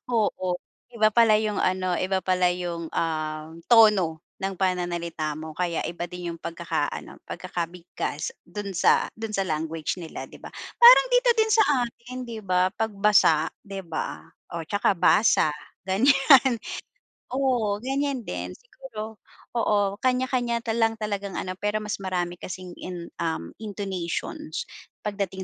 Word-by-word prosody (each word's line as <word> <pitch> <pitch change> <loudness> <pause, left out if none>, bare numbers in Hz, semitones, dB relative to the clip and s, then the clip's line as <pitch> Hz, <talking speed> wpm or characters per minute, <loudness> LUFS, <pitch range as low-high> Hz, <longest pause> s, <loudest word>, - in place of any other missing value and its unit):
Oo. 185 -5 0 0.3
Iba 220 -2 +2
pala 225 -2 +6
yung 215 -2 -1
ano, 185 -1 +1
iba 190 +1 0
pala 180 -1 +3
yung, 175 -2 -4
um, 155 -1 -2 0.2
tono 210 -8 +6 0.2
ng 195 -1 -2
pananalita 170 -4 -1
mo. 155 0 -7
Kaya 170 -1 -1
iba 175 +1 -4
din 175 -1 -5
yung 165 - -14
pagkaka-ano, 170 0 -3
pagkakabigkas 170 -3 -4
dun 200 +2 -6
sa - - +4
dun 225 0 -5
sa 195 - +1
language 160 0 -2
nila, 160 - -6
di - - -16
ba? - - -7 0.3
Parang - - +10
dito - - +5
din 440 0 +3
sa 435 0 +6 0.2
atin, 240 +2 -11
di 225 -2 -6
ba? 185 0 +2
'Pag 220 0 -1
basa, 190 -6 +5 0.2
di 195 -1 -7
ba? 165 - -3 0.3
O 170 -1 -4
tsaka 205 0 +1
basa 180 -7 +4 0.3
ganiyan, 265 +4 +5 0.8
oo, 245 -6 +1
ganiyan 270 -1 -1
din - - -5
siguro. 230 - -9 0.4
Oo, 205 -3 +2
kanya-kanya 250 -2 +1
talang 225 -1 +1
talagang 200 -2 -3
ano, 185 0 -4
pero 210 +1 0
mas 210 -1 -3
marami 180 -2 -2
kasing 185 -1 -7
in 175 -2 -6
um, 160 - -2
intonations, 190 -5 -4 0.4
pagdating 195 -2 -3
195 Hz, 140 wpm, -25 LUFS, 175-225 Hz, 0.8 s, Parang